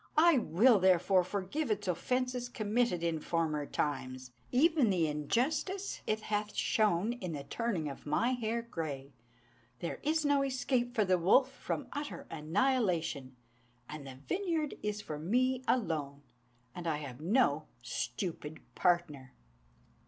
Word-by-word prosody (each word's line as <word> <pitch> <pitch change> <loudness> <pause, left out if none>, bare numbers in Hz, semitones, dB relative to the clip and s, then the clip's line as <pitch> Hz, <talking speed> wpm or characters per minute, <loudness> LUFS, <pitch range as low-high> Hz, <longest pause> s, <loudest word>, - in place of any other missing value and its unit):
I 320 -3 +6
will, 225 +3 +4
therefore, 185 0 +4
forgive 200 - -3
its 205 -2 -1
offences 250 +7 -1
committed 215 -5 0
in 165 -2 0
former 155 -3 -1
times; 130 -3 -3 0.2
Even 295 -2 +4
the 180 -4 +2
injustice 265 - -1
it 215 0 0
hath 210 0 -2
shown 215 0 +2
in 185 -9 -5
the 140 -2 -5
turning 195 -3 -2
of 140 +1 -8
my 230 +12 +2
hair 235 -2 -1
grey. 145 - -5 0.6
There 170 - -4
is 310 +1 +1
no 285 -1 +4
escape 255 -2 0
for 215 - +3
the 185 -1 +3
wolf 255 +10 +4
from 270 - -4
utter 290 +1 -5
annihilation; 165 - 0 0.5
And 150 -2 -8
the 130 - -8
vineyard 335 -6 -1
is 210 0 -2
for 150 -6 -6
me 255 +9 +1
alone, 150 - 0 0.5
and 175 -1 -6
I 155 -2 +1
have 140 -3 -8
no 165 - +2 0.2
stupid 150 - -4
partner." 160 -7 0
195 Hz, 135 wpm, -32 LUFS, 155-250 Hz, 0.6 s, I